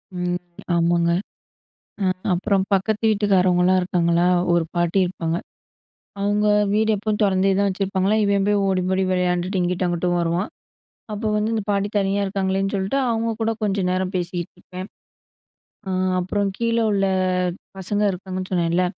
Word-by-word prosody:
ம். 180 0 -1 0.4
ஆமாங்க, 170 0 +2 0.9
அ - - +2 0.3
அப்புறம் 195 +2 +1
பக்கத்து 210 +3 0
வீட்டுக்காரவங்கலாம் 185 -3 +3
இருக்காங்களா, 175 -1 +2 0.3
ஒரு 170 -1 +2
பாட்டி 175 +2 +1
இருப்பாங்க. 170 -2 -2 0.8
அவங்க 205 +1 +1 0.3
வீடு 220 +1 +2
எப்போவும் 215 +1 -2
தொறந்தே 195 0 +3
தான் 200 - +3
வச்சிருப்பாங்களா! 195 +1 0
இவன் 200 -1 +2
போய் 205 -1 +2
ஓடி, 190 -1 +1
ஓடி 190 0 +2
விளையாண்டுட்டு 180 +1 0
இங்கிட்டும், 180 +1 0
அங்கிட்டும் 175 0 0
வருவான். 170 +4 -1 0.6
அப்போ 215 +1 -2
வந்து 210 +1 0
"இந்த 220 - -1
பாட்டி 200 0 +1
தனியா 195 +1 0
இருக்காங்களேன்னு 195 0 -1
சொல்ட்டு 195 +7 -1
அவங்க 230 0 0
கூட 225 0 +1
கொஞ்ச 205 -1 0
நேரம் 185 +1 -1
பேசிட்டு 175 -1 -3
இருப்பேன். 185 +1 -8 1.0
அ - - -2 0.3
அப்புறம் 200 +2 -1
கீழ 230 0 0 0.2
உள்ள 195 -1 +2 0.4
அ - - 0 0.3
பசங்க 205 +2 -1
இருக்காங்க"ன்னு 185 0 -6
சொன்னேன்ல, 175 0 +2
190 Hz, 140 wpm, -22 LUFS, 180-200 Hz, 1.0 s, வீட்டுக்காரவங்கலாம்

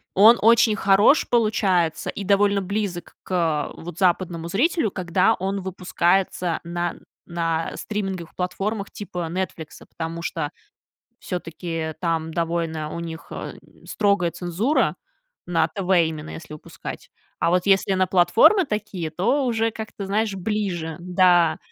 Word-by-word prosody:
он 220 +5 +8
очень 225 0 +5
хорош 200 +7 +4
получается 195 -8 +1
и 200 - -5
довольно 200 0 +3
близок 190 -3 -4
к, - - -13
а, 160 -5 0
вот, 175 0 -9
западному 175 -2 0
зрителю, 245 - +1
когда 185 +1 +2
он 195 +1 -3
выпускается 180 -1 0
на 175 0 -3 0.4
на 165 -1 -1
стриминговых 195 -5 -4
платформах 200 +3 -3
типа 180 -4 -5
"Нетфликса", 170 -3 -5
потому 165 0 -6
что 160 -3 -2 0.7
всё-таки, 175 -1 -6 0.2
э, - - -6
там 165 -2 -1
довольно 165 -2 -2
у 170 - -4
них, 165 -1 -7
эм, - - -6 0.3
строгая 200 -4 +1
цензура, 175 - 0 0.5
на 165 -2 +2
ТВ 185 +3 -5 0.2
именно, 155 -1 -5
если 160 -1 -9
выпускать, 150 - -9 0.3
а - - +2
вот 180 +1 +2
если 195 0 +3
на 185 0 +2
платформе 265 - +5
такие, 210 - -3
то 240 - +1
уже 225 -2 +1
как-то, 220 -2 -7
знаешь, 205 +1 0
ближе, 185 -5 -2
да, 175 -2 +3
180 Hz, 135 wpm, -23 LUFS, 170-205 Hz, 0.7 s, он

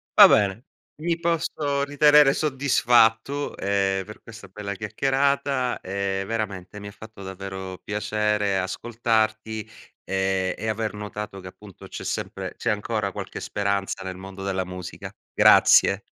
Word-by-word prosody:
Va - - +11
bene. 100 +1 +2 0.4
Mi 170 0 -1
posso 155 -4 -1
ritenere 145 0 +5
soddisfatto, 135 -2 +2
ehm, 95 -1 0
per 105 - -12
questa 115 -2 -12
bella 100 +1 -6
chiacchierata, 135 +4 0
ehm, 95 0 -2
veramente 105 -3 -4
mi 100 - -8
ha - - -8
fatto 110 -1 -12
davvero 95 0 -7
piacere 105 -1 0
ascoltarti 110 +1 -1 0.3
e 95 -1 0
e 110 - -4
aver 110 0 -2
notato 105 -1 -6
che 95 - -10
appunto 100 0 -13
c'è - - -8
sempre - - -4
c'è - - -2
ancora 105 -1 -2
qualche - - -6
speranza 100 -1 -2
nel 95 -1 -6
mondo 95 +1 -9
della 95 -1 -1
musica. 90 -1 -8 0.2
Grazie. 100 +1 +6
105 Hz, 135 wpm, -24 LUFS, 95-120 Hz, 0.4 s, Va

